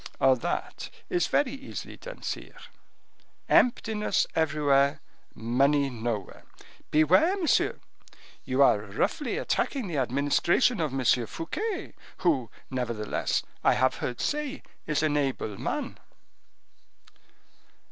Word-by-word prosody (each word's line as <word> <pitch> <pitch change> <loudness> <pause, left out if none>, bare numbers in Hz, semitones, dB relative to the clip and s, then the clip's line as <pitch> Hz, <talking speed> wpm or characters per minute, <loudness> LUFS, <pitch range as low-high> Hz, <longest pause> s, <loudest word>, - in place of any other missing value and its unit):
"That 130 -2 0 0.2
is 175 - +2
very 280 -3 +2
easily 275 0 -7
done, - - -10
sire: - - -5 0.9
emptiness 220 -3 +2
everywhere, 145 -3 +2 0.4
money 135 +5 +2
nowhere." 115 -4 -4 0.5
"Beware, 185 - +4
monsieur; 340 -6 +2 0.7
you - - +3
are - - +5
roughly - - -2
attacking 270 -5 -1
the 170 -6 -3
administration 145 - +2
of 155 -4 0
M. 130 -1 -2 0.2
Fouquet, 375 - -4 0.2
who, 140 - +1 0.2
nevertheless, 120 -5 -1 0.2
I - - +4
have 130 +1 +2
heard 125 - -4
say, 295 -1 -2 0.2
is 150 0 0
an 150 -1 +2
able 130 -8 -2
man." - - -3
150 Hz, 105 wpm, -27 LUFS, -, 0.9 s, are